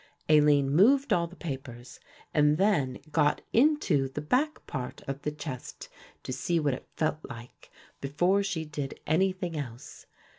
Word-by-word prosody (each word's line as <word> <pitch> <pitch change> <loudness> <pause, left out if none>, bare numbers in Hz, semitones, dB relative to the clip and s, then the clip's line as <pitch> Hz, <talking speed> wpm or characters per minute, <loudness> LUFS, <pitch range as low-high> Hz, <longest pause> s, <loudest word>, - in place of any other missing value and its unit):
Aline 145 -2 +5
moved 260 - +5
all 170 -1 +2
the 175 - -14
papers 130 -7 -7 0.3
and 150 0 +4
then 170 -10 +2
got 150 -2 +2
into 240 - +3
the 135 - -5
back 260 - 0
part 130 -4 -6
of 140 +1 -4
the 150 - -1
chest 145 -4 -7 0.3
to 130 - -4
see 150 +7 0
what 145 -3 +1
it 130 - -8
felt 155 -1 0
like, 120 -3 -11 0.3
before 175 +8 +1
she 180 -5 -2
did 145 -3 -5
anything 185 +2 0
else. 130 -5 -7
150 Hz, 150 wpm, -28 LUFS, 135-180 Hz, 0.3 s, Aline